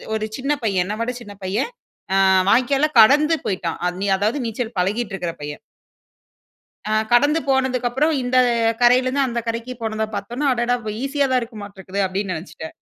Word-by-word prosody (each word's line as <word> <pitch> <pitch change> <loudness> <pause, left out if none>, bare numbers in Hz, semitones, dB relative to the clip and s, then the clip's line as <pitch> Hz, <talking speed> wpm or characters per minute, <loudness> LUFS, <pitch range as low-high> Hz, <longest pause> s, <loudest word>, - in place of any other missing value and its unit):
1 215 0 -2
சின்ன 275 +3 -2
பையன் 190 -4 +1
என்ன 210 +2 -3
விட 240 +2 -1
சின்ன 205 -2 -10
பையன் 205 - -1 0.5
அ - - +4 0.3
வாய்க்கால்ல 270 +5 +3
கடந்து 295 +8 +6
போய்ட்டான். 175 -4 -2
அத் 180 +2 -4 0.2
அதாவது 220 +8 0
நீச்சல் 225 0 -4
பழகிட்டு 205 +3 -1
இருக்கற 175 -3 -3
பையன். 145 +5 -6 1.3
ஆ - - -1 0.2
கடந்து 290 +6 +4
போனதுக்கப்புறம், 265 +2 +1
இந்த 250 +1 0 0.5
கரையிலருந்து, 255 +3 +4
அந்த 235 -1 -2
கரைக்கு 230 +2 -3
போனத 220 0 -1
பார்த்தவுடனே, 240 +9 -3
"அடடா! 245 +1 +1
அப்ப 215 -1 -5
ஈஸியாதான் 275 -2 +1
இருக்கமாட்டிருக்குது" 200 -3 -5
அப்பிடீன்னு 190 -1 -3
நினைச்சுட்டேன். 160 -2 -10
235 Hz, 150 wpm, -21 LUFS, 200-260 Hz, 1.3 s, கடந்து